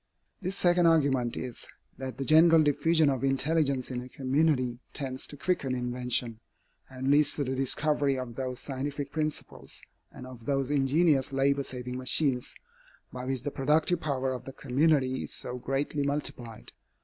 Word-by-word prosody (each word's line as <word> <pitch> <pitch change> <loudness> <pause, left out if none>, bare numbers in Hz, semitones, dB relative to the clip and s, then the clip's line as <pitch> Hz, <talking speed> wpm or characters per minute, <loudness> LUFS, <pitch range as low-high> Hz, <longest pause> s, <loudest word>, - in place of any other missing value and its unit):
This 190 +1 -3
second 175 -2 +3
argument 140 -7 +2
is, 125 -2 -5 0.3
that 130 -1 -5
the 135 - -3
general 160 +2 +6
diffusion 155 +2 +3
of 135 -2 0
intelligence 135 -1 +1
in 125 -1 -3
a 125 - -10
community 130 -2 +1
tends 130 -2 -4
to 145 - -8
quicken 140 -6 -1
invention, 125 -2 -1 0.5
and 130 +1 -2
leads 150 +1 +5
to 145 - -1
the 130 -1 -2
discovery 140 +1 +1
of 125 -2 -5
those 130 0 -4
scientific 140 +1 -4
principles 155 -1 -4 0.3
and 125 - -10
of 125 -3 -12
those 135 -1 0
ingenious 145 0 +2
labor 140 +1 +2
saving 125 -1 -5
machines, 130 -1 +1 0.6
by 125 0 -6
which 130 -1 -2
the 145 - -2
productive 155 +6 +2
power 135 -3 -1
of 125 - -7
the 135 - -8
community 135 -1 +1
is - - -5
so 125 0 -4
greatly 135 +3 -2
multiplied. 140 -5 -3
135 Hz, 160 wpm, -29 LUFS, 130-150 Hz, 0.6 s, general